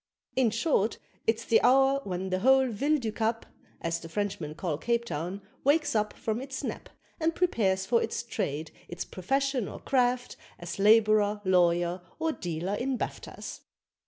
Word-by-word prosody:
In 260 Hz, -3 st, +4 dB
short, 230 Hz, -1 st, +1 dB, 0.3 s
it's 225 Hz, +1 st, +1 dB
the 225 Hz, -, +4 dB
hour 270 Hz, +2 st, +4 dB
when 190 Hz, 0 st, -3 dB
the 185 Hz, -, +1 dB
whole 265 Hz, +4 st, +5 dB
Ville 285 Hz, +8 st, +1 dB
du 230 Hz, -6 st, -3 dB
Cap 225 Hz, +1 st, -1 dB, 0.4 s
(As 165 Hz, 0 st, -1 dB
the 165 Hz, -, -10 dB
Frenchmen 180 Hz, -5 st, -3 dB
call 155 Hz, -3 st, -2 dB
Cape 235 Hz, +3 st, 0 dB
Town) 175 Hz, +3 st, -4 dB, 0.2 s
wakes 295 Hz, +3 st, +3 dB
up 210 Hz, 0 st, +1 dB
from 220 Hz, +2 st, -3 dB
its 265 Hz, 0 st, -6 dB
nap -, -, -5 dB, 0.3 s
And 325 Hz, 0 st, +1 dB
prepares 195 Hz, -, +1 dB
for 230 Hz, +3 st, +3 dB
its -, -, -2 dB
trade, 155 Hz, -9 st, -3 dB, 0.2 s
its 175 Hz, 0 st, -5 dB
profession 270 Hz, +4 st, -1 dB
or -, -, -8 dB
craft, 250 Hz, -2 st, +1 dB, 0.2 s
as 175 Hz, +2 st, -7 dB
Labourer, 215 Hz, 0 st, +5 dB
lawyer, 175 Hz, -1 st, +3 dB, 0.2 s
or 320 Hz, 0 st, 0 dB
dealer 175 Hz, -, -3 dB
in 255 Hz, +4 st, -1 dB
baftas. -, -, -6 dB
215 Hz, 160 wpm, -29 LUFS, 185-255 Hz, 0.4 s, whole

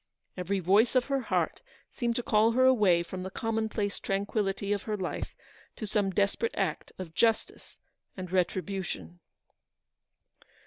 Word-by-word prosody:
Every 190 Hz, +2 st, -1 dB
voice 200 Hz, +8 st, +4 dB
of 250 Hz, -1 st, +4 dB
her 275 Hz, -1 st, 0 dB
heart 250 Hz, -, -1 dB, 0.3 s
seemed 235 Hz, -2 st, -1 dB
to 245 Hz, -, -1 dB
call 220 Hz, +1 st, +4 dB
her 255 Hz, +2 st, +4 dB
away 205 Hz, -10 st, +5 dB
from 185 Hz, +2 st, -6 dB
the 190 Hz, -, -4 dB
commonplace 220 Hz, -1 st, -2 dB
tranquillity 200 Hz, 0 st, -1 dB
of 200 Hz, -, -2 dB
her 215 Hz, -1 st, -3 dB
life 185 Hz, -3 st, -4 dB, 0.4 s
to 220 Hz, -, -5 dB
some 205 Hz, -1 st, +1 dB
desperate 200 Hz, +4 st, 0 dB
act 190 Hz, -6 st, -1 dB
of 180 Hz, -4 st, -7 dB
justice 225 Hz, +4 st, 0 dB, 0.4 s
and 185 Hz, -2 st, -6 dB
retribution. 180 Hz, -, -2 dB
200 Hz, 140 wpm, -29 LUFS, 185-225 Hz, 0.4 s, away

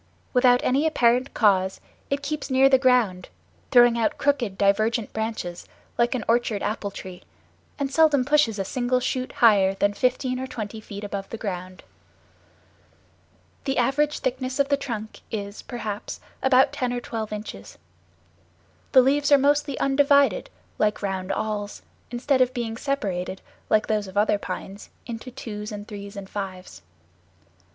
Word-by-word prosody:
Without 250 Hz, -1 st, +5 dB
any 280 Hz, +5 st, +2 dB
apparent 250 Hz, -3 st, +2 dB
cause 190 Hz, -3 st, +3 dB, 0.3 s
it 280 Hz, +1 st, -1 dB
keeps 300 Hz, +1 st, -3 dB
near 265 Hz, +1 st, +5 dB
the 265 Hz, -1 st, +5 dB
ground, 245 Hz, -8 st, +2 dB, 0.4 s
throwing 240 Hz, -2 st, +6 dB
out 225 Hz, -, 0 dB
crooked, 250 Hz, -9 st, 0 dB
divergent 215 Hz, +3 st, +1 dB
branches 220 Hz, -6 st, -4 dB, 0.3 s
like 240 Hz, +2 st, +1 dB
an 240 Hz, -, -2 dB
orchard 230 Hz, -3 st, +1 dB
apple 210 Hz, -1 st, -2 dB
tree, 185 Hz, -2 st, -9 dB, 0.6 s
and 275 Hz, -1 st, -2 dB
seldom 300 Hz, -5 st, +4 dB
pushes 290 Hz, -7 st, +3 dB
a 195 Hz, -, -2 dB
single 250 Hz, +3 st, 0 dB
shoot 255 Hz, 0 st, -2 dB
higher 200 Hz, -4 st, +4 dB
than 205 Hz, +1 st, +1 dB
fifteen 255 Hz, +2 st, 0 dB
or 260 Hz, -, -4 dB
twenty 220 Hz, -2 st, -6 dB
feet 205 Hz, -1 st, -8 dB
above 200 Hz, -1 st, -5 dB
the 230 Hz, -, -6 dB
ground. 185 Hz, -3 st, -6 dB, 1.8 s
The 270 Hz, -1 st, -1 dB
average 285 Hz, +5 st, +1 dB
thickness 255 Hz, 0 st, -2 dB
of 280 Hz, -1 st, +1 dB
the 285 Hz, -, +4 dB
trunk 230 Hz, -6 st, -6 dB
is, 200 Hz, -1 st, -5 dB
perhaps, 215 Hz, -4 st, -6 dB, 0.2 s
about 265 Hz, 0 st, +4 dB
ten 250 Hz, -1 st, -1 dB
or 245 Hz, -, -2 dB
twelve 225 Hz, -3 st, -5 dB
inches. 210 Hz, 0 st, -7 dB, 1.2 s
The 260 Hz, -2 st, +8 dB
leaves 285 Hz, +2 st, +2 dB
are 285 Hz, -, +9 dB
mostly 285 Hz, 0 st, +1 dB
undivided, 280 Hz, 0 st, +3 dB, 0.3 s
like 210 Hz, 0 st, +1 dB
round 190 Hz, -1 st, -2 dB
awls, 205 Hz, 0 st, -3 dB, 0.3 s
instead 260 Hz, +2 st, +1 dB
of 255 Hz, 0 st, +2 dB
being 230 Hz, -2 st, -3 dB
separated, 195 Hz, -9 st, -3 dB, 0.3 s
like 215 Hz, 0 st, +3 dB
those 210 Hz, -2 st, -1 dB
of 190 Hz, +1 st, -9 dB
other 205 Hz, 0 st, +3 dB
pines, 195 Hz, +1 st, -7 dB, 0.2 s
into 235 Hz, +1 st, -7 dB
twos 210 Hz, -3 st, -7 dB
and 205 Hz, 0 st, -7 dB
threes 200 Hz, -1 st, -8 dB
and 200 Hz, -1 st, -7 dB
fives. 185 Hz, -, -7 dB
230 Hz, 150 wpm, -24 LUFS, 205-260 Hz, 1.8 s, are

